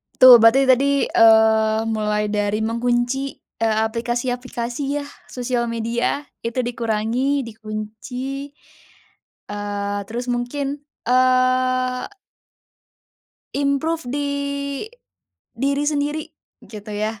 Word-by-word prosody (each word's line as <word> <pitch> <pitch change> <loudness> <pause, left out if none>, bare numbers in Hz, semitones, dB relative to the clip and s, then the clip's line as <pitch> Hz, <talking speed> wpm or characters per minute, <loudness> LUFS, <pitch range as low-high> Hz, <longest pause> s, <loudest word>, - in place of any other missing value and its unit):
Tuh. 250 -2 +10
Berarti 230 +5 +6
tadi, 265 +1 +4
eee, 220 -1 +4
mulai 210 -1 -1
dari 210 +1 0
mengunci, 240 +4 0 0.2
eee, 225 -1 +1
aplikasi-aplikasi, 245 +4 -3
ya. - - -9 0.2
Sosial 245 -1 -2
media 230 +5 -1 0.2
itu 230 +2 -3
dikurangi, 235 +4 -1
dikunci, 230 +5 -6 1.0
eee, 205 0 -3
terus 240 +3 -5
mungkin, 275 +4 -3 0.3
eee 255 0 +2 1.5
improve 285 +4 0
di 285 +1 -1 1.3
diri 280 +1 0
sendiri, 295 +1 -1 0.4
gitu, 210 -1 -11
ya. 215 0 -3
245 Hz, 85 wpm, -21 LUFS, 220-270 Hz, 1.5 s, Tuh